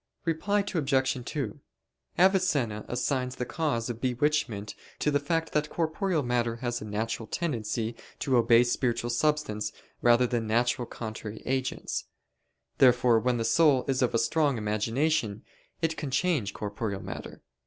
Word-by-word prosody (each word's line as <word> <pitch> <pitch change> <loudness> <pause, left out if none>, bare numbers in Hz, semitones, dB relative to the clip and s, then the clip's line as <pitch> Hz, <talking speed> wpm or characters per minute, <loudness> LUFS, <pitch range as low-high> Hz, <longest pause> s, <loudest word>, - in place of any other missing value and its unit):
Reply 200 +5 +1
Obj. 135 -5 +1
2: 130 -9 -4 0.6
Avicenna 175 - +2
assigns 125 0 -1
the 125 - -3
cause 140 -7 -1
of 120 -2 -5
bewitchment 125 -5 0 0.2
to 150 - +1
the 145 - +3
fact 165 +3 -1
that 150 0 0
corporeal 165 0 0
matter 120 -2 0
has 120 0 -3
a - - -6
natural 110 +2 -3
tendency 115 -6 -2 0.2
to 130 - 0
obey 120 0 +6
spiritual 120 -1 0
substance 120 -6 0 0.3
rather 120 +1 +5
than 120 -2 -1
natural 120 +2 +1
contrary 110 -1 -7
agents. 130 0 -2 0.7
Therefore 125 -2 +5
when 125 +1 +1
the 115 - -1
soul 135 +2 +4
is 135 -1 +1
of 120 -2 +2
strong 145 +2 +2
imagination, 110 +2 0 0.4
it 160 -1 +1
can 150 - -3
change 140 - +1
corporeal 105 -1 -4
matter. - - -8
125 Hz, 140 wpm, -28 LUFS, 115-150 Hz, 0.7 s, obey